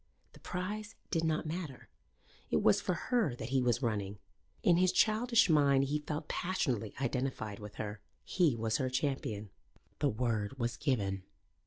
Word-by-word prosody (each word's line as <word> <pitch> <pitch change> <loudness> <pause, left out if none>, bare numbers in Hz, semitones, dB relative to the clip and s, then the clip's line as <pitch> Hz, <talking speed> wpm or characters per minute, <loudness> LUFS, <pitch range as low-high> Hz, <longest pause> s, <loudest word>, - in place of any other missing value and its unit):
The - - -15
prize 205 +4 -4 0.2
did 165 -2 +1
not 160 -1 +1
matter. 155 -4 -5 0.6
It - - +2
was 105 - +5
for 180 - 0
her 220 - +1
that 115 0 -6
he 135 0 +2
was 125 +1 +1
running. 105 -3 -1 0.5
In 175 -2 +5
his 185 0 +4
childish 225 +2 +4
mind 140 -4 +5
he 145 +2 0
felt 150 +1 -4
passionately 130 - -1
identified 125 -5 -2
with 105 -1 -9
her. 105 -1 -5 0.2
He 170 -9 +2
was 110 0 0
her 130 -1 0
champion. 125 -6 -2 0.5
The 145 - +3
word 115 0 -1
was 120 -2 -1
given. 100 -9 0
135 Hz, 160 wpm, -33 LUFS, 110-165 Hz, 0.6 s, was